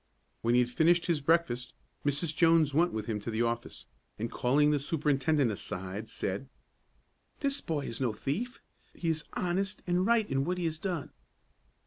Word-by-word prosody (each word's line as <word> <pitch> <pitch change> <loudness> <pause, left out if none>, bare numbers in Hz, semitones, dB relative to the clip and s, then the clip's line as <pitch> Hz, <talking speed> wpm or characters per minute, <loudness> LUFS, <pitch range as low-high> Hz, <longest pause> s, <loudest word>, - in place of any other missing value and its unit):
When 120 +1 +2
he 125 - +6
had 120 - 0
finished 170 +5 +4
his 165 -4 +1
breakfast, 145 -5 +1 0.3
Mrs. 145 +3 +1
Jones 165 -2 +4
went 170 +4 +3
with 110 -1 -3
him 110 -2 -2
to 105 - -5
the 115 +1 0
office, 115 0 -3 0.3
and 115 +2 -3
calling 145 +4 +3
the 145 - +2
superintendent 145 -2 +1
aside, 95 +2 -5
said, 100 +8 -3 0.9
"This 280 0 +1
boy 160 -4 -2
is 115 - -5
no 125 -3 +2
thief. 180 - -3 0.3
He 165 - -2
is 160 -1 -1
honest 190 +3 -1
and 180 +1 +2
right 225 0 +3
in 135 0 0
what 180 +5 -1
he 175 - -1
has 160 -1 -2
done." 175 -6 -3
150 Hz, 175 wpm, -30 LUFS, 120-170 Hz, 0.9 s, he